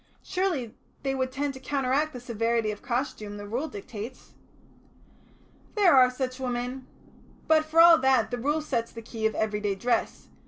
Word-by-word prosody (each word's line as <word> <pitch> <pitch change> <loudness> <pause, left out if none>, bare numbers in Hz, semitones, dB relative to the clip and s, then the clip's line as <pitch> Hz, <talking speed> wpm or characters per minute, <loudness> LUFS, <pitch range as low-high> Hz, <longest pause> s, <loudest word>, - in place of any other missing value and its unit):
Surely 340 - -1 0.3
they 270 -1 0
would 260 -1 -1
tend 280 +1 -2
to 265 - -10
counteract 275 +2 0
the 250 - -8
severity 230 -2 0
of 205 - -8
costume 235 -5 -3
the 205 - -7
Rule 250 +9 -2
dictates." 220 +1 -9 1.4
"There 390 -8 +5
are 255 -1 +7
such 255 0 -4
women. 250 +1 -3 0.6
But 315 -1 +4
for 315 +1 +1
all 335 -1 +9
that 265 -4 +3
the 245 - -2
Rule 295 +5 0
sets 230 -6 -2
the 230 - -9
key 220 -1 -1
of 220 - -5
everyday 210 -2 -1
dress. 240 +5 -1
255 Hz, 165 wpm, -27 LUFS, 230-280 Hz, 1.4 s, all